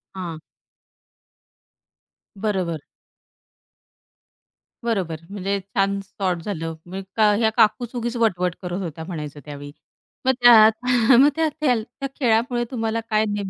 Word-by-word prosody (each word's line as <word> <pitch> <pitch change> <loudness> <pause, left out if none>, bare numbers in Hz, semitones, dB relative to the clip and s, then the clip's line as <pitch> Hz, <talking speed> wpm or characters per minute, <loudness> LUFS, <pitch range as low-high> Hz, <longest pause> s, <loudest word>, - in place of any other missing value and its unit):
हां. 170 -4 -5 2.0
बरोबर. 190 -6 -2 2.0
बरोबर. 190 -9 -1
म्हणजे 200 0 -2
छान 195 +1 -1
सॉर्ट 190 -2 -3
झालं. 165 -5 -4
म्हणजे 190 +4 -3 0.2
ह्या 220 -1 +3
काकूच 240 +3 +2
उगीच 240 0 -3
वटवट 180 -6 +1
करत 180 +1 -4
होत्या 160 -2 -6
म्हणायचं 150 -5 -6
त्यावेळी. 145 -1 -8 0.5
मग 260 - +5
त्यात 220 0 +7 0.3
मग 285 +2 +7
त्या 320 -1 +1
त्या. 295 -4 +1 0.4
खेळामुळे 240 0 +2
तुम्हाला 225 -2 -1
काय 215 -1 +2
नेम 205 -2 -3
200 Hz, 110 wpm, -22 LUFS, 180-230 Hz, 2.0 s, त्यात